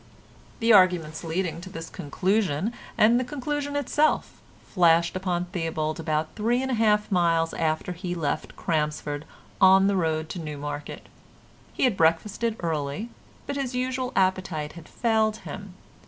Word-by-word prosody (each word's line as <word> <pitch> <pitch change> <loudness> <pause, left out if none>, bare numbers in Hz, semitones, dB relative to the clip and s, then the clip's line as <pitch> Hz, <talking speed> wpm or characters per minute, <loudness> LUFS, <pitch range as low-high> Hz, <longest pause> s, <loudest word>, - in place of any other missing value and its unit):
The 230 0 +5
arguments 180 -5 +4
leading 170 0 -2
to 185 - -9
this 165 -2 -7
conclusion, 190 +4 -1 0.2
and 230 +3 +5
the - - 0
conclusion 285 +2 -3
itself, 290 +2 +1 0.2
flashed 170 -1 +3
upon 180 -2 -1
Theobald 165 -2 -3
about 155 -1 -1
three 235 +3 +1
and 265 - -2
a - - +1
half 210 -2 +2
miles 165 -3 +2
after 160 +2 -1
he 180 +1 -6
had - - -5
left 155 -4 -2
Crampsford 150 -2 -2 0.4
on 190 0 +7
the 200 0 +2
road 160 -3 0
to 180 - -5
Newmarket. 145 -2 -6 0.7
He - - -2
had 250 -6 +3
breakfasted 200 +8 +1
early, 160 +5 -2 0.4
but 280 0 -3
his 265 -2 -3
usual 255 0 -1
appetite 185 -5 0
had 170 -2 -12
failed 220 -2 +1
him. 195 -2 -8
180 Hz, 150 wpm, -26 LUFS, 160-220 Hz, 0.7 s, on